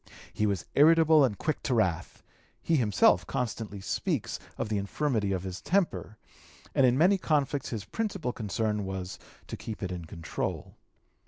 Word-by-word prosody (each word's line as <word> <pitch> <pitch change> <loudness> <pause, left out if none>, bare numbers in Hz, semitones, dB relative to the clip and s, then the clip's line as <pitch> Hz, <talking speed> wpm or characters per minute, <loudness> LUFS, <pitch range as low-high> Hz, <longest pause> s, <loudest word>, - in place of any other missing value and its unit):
He 105 - +1
was 100 -4 -1
irritable 160 0 +6
and 110 -7 +1
quick 155 -2 -2
to 125 - 0
wrath; 90 -7 -1 0.4
he 165 - +1
himself 110 - +3
constantly 110 -4 -3
speaks - - -2 0.2
of - - -2
the 105 -1 0
infirmity 105 0 -1
of 95 -2 -1
his 95 -1 -6
temper, 175 - 0 0.6
and 135 - +5
in 125 - +3
his - - 0
many 190 +6 +4
conflicts 145 -4 0
his 110 -5 -4
principal 195 - -3
concern 105 -1 -1
was 95 -1 -5 0.3
to - - -6
keep 110 -2 -7
it 90 - -2
in 90 -2 -5
control. 80 +1 -5
110 Hz, 165 wpm, -29 LUFS, 100-150 Hz, 0.6 s, irritable